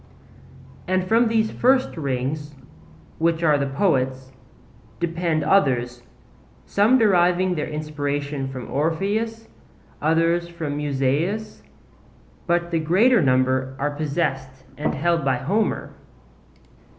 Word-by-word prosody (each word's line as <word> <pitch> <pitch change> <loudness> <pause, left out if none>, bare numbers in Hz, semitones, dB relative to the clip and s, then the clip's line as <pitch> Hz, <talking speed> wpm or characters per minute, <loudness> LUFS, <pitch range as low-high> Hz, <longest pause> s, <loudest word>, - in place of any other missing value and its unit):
And 185 0 +1
from 230 +3 +3
these 220 -1 +1
first 260 +1 +2
rings, 145 0 -3 0.6
which 165 0 +1
are 150 -3 +4
the 140 - -1
poets, 130 -4 0 0.7
depend 170 -2 -1
others, 125 -10 +1 0.6
some 215 +6 +3
deriving 185 -4 +3
their 155 -4 -3
inspiration 145 -2 -3
from 130 -2 -7
Orpheus, 205 +9 -1 0.5
others 165 +2 +1
from 160 -4 -5
Musaeus; 150 +10 -1 0.9
but 175 0 0
the 165 - +1
greater 195 +9 +4
number 130 -1 +1
are 145 +2 -1
possessed 140 -3 -3
and 150 - -2
held 170 +2 +1
by 135 -1 +2
Homer. 200 - -1
155 Hz, 105 wpm, -22 LUFS, 140-185 Hz, 0.9 s, are